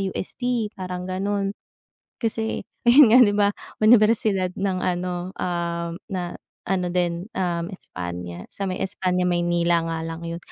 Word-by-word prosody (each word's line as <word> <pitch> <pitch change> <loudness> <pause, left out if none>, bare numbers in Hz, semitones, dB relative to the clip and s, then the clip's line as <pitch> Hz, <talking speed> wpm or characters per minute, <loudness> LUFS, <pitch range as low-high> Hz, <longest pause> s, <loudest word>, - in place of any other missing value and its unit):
UST 220 +4 -2
parang 180 -1 -4
ganon. 195 +2 -1 0.7
Kasi, 225 0 -1 0.2
yon 245 -1 +8
nga 250 - +9
di 205 - +2
ba, 205 -1 +4 0.3
unibersidad 215 -4 +4
ng 190 -1 -1
ano, 180 0 -2
ah, 170 -1 -2 0.2
na 180 -2 -3 0.3
ano 185 -1 0
din, 175 0 0
um, 170 -2 -1
Espanya, 90 - -7
sa 200 - -5
may 185 - -3
Espanya 180 -1 0
Maynila 175 -1 +2
nga 165 0 -2
lang 165 +1 -6
yon, 170 0 -4
180 Hz, 135 wpm, -24 LUFS, 170-200 Hz, 0.7 s, nga